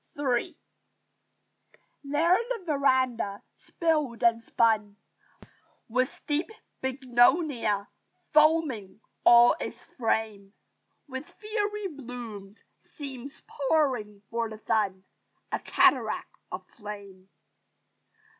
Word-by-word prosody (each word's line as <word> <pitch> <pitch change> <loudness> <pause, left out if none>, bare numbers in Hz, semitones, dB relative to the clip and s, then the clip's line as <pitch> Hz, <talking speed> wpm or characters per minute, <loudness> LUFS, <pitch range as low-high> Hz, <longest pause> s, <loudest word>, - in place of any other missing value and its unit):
III 285 +4 0 1.5
There 315 +6 +3
the 465 -6 -3
verandah, 260 - +1
spilled 300 -9 -1
and 230 -1 +3
spun 215 -3 +1 0.9
With 255 +3 -1
deep 300 +6 0 0.3
bignonia, 255 - +2 0.5
foaming 300 -11 +3 0.2
all 240 0 +8
its - - -5
frame 220 -4 -2 0.5
With 260 +1 -7
fiery 420 -1 -3
blooms, 235 - -9 0.2
seems 275 -1 -9
pouring 260 -9 0
for 230 -1 -1
the 220 - -8
sun 195 -4 0 0.5
A - - 0
cataract - - +2 0.2
of - - -6
flame. 200 -3 -10
250 Hz, 85 wpm, -28 LUFS, 215-295 Hz, 1.5 s, all